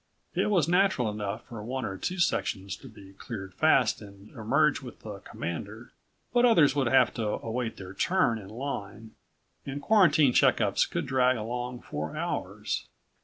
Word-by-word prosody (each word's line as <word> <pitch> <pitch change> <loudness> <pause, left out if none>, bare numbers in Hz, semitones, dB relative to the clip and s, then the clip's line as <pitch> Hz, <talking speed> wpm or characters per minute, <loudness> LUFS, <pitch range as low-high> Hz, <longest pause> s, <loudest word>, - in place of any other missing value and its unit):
It - - +1
was 175 -7 +3
natural 175 - +2
enough 105 +1 -4
for 115 -4 -8
one 130 +2 -3
or 95 - -4
two 180 - -3
sections 100 - 0
to 135 - -13
be 100 -4 -14
cleared 95 -2 -7
fast 135 -9 +3
and 100 0 -13
emerge 140 +7 +1
with 125 -3 -11
the 105 -2 -8
Commander. 100 +7 -6 0.4
But 240 0 +4
others 170 - +5
would 140 -4 +1
have 130 0 +4
to 115 - -3
await 115 +2 -3
their 95 -1 -9
turn 120 - +1
in 95 -2 -11
line 110 -3 -6 0.5
and 140 +1 -5
quarantine 155 - +4
checkups - - +3
could - - -2
drag 130 -1 +2
along 120 +2 -4
for 75 +1 -5
hours. - - -3
120 Hz, 165 wpm, -28 LUFS, 105-140 Hz, 0.5 s, others